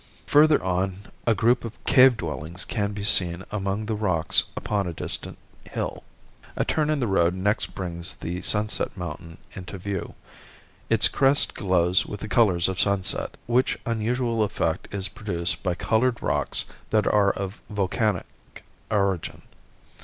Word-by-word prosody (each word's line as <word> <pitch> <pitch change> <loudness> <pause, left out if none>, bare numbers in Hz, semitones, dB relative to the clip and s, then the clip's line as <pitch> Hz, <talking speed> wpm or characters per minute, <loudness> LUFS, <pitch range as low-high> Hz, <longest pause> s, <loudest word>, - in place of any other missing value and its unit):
Further 150 +1 +5
on 95 +1 -1 0.3
a 115 - +4
group 120 +3 +2
of 115 -1 -7
cave 130 -2 +6
dwellings 85 +1 -5
can 100 -3 -2
be 100 -1 -6
seen 90 -3 +5
among 100 +1 -2
the 110 - -2
rocks 90 -7 +2
upon 100 -3 -1
a 85 - -4
distant - - -4 0.4
bill. - - -3 0.5
A - - 0
turn 155 -1 0
in 155 -1 +1
the 125 - 0
road 90 -4 +2
next 100 +4 -1
brings 90 -1 -4
the 90 +1 -5
Sunset 105 +2 +1
Mountain 85 -1 -7 0.2
into 95 +1 -8
view. 95 0 -5 0.7
Its - - +5
crest 135 +1 +2
glows 90 -1 +2
with 105 -1 -7
the - - -5
colors 100 -7 +3
of 95 -1 -3
sunset, 100 -2 0
which 120 +4 +1
unusual 115 +1 -1
effect 95 -5 -1
is 100 -1 -1
produced 100 -5 -1
by 90 -2 -1
colored 120 +5 0
rocks 75 0 0 0.2
that 110 -1 +2
are 105 -2 +3
of 100 +2 -6
volcanic 105 -1 0 0.6
origin. 100 -4 -1
100 Hz, 150 wpm, -25 LUFS, 90-110 Hz, 0.7 s, cave